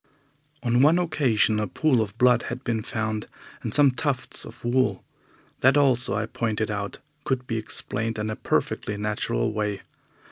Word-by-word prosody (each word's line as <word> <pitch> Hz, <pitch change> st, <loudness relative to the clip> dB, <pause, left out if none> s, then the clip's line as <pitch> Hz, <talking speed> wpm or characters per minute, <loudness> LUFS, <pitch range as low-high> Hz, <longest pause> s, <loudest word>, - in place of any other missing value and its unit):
On 120 Hz, 0 st, +3 dB
one 155 Hz, +5 st, +6 dB
occasion 135 Hz, -11 st, +2 dB
a 105 Hz, -, -1 dB
pool 130 Hz, -, +2 dB
of 105 Hz, 0 st, -4 dB
blood 125 Hz, -1 st, +5 dB
had 125 Hz, +2 st, -5 dB
been 115 Hz, -3 st, -1 dB
found, 110 Hz, 0 st, -3 dB, 0.3 s
and -, -, -3 dB
some 145 Hz, -2 st, +5 dB
tufts 125 Hz, +1 st, -2 dB
of -, -, -12 dB
wool. 130 Hz, +2 st, +1 dB, 0.6 s
That 130 Hz, +3 st, +5 dB
also, 125 Hz, -7 st, +3 dB
I 105 Hz, +1 st, 0 dB
pointed 110 Hz, -1 st, -2 dB
out, 100 Hz, -1 st, -3 dB, 0.3 s
could 130 Hz, -1 st, -1 dB
be 115 Hz, -2 st, -2 dB
explained 110 Hz, +1 st, -3 dB
in 105 Hz, 0 st, -2 dB
a -, -, -3 dB
perfectly 105 Hz, -1 st, -1 dB
natural 105 Hz, -, -1 dB
way. 105 Hz, -2 st, -2 dB
115 Hz, 165 wpm, -25 LUFS, 105-130 Hz, 0.6 s, one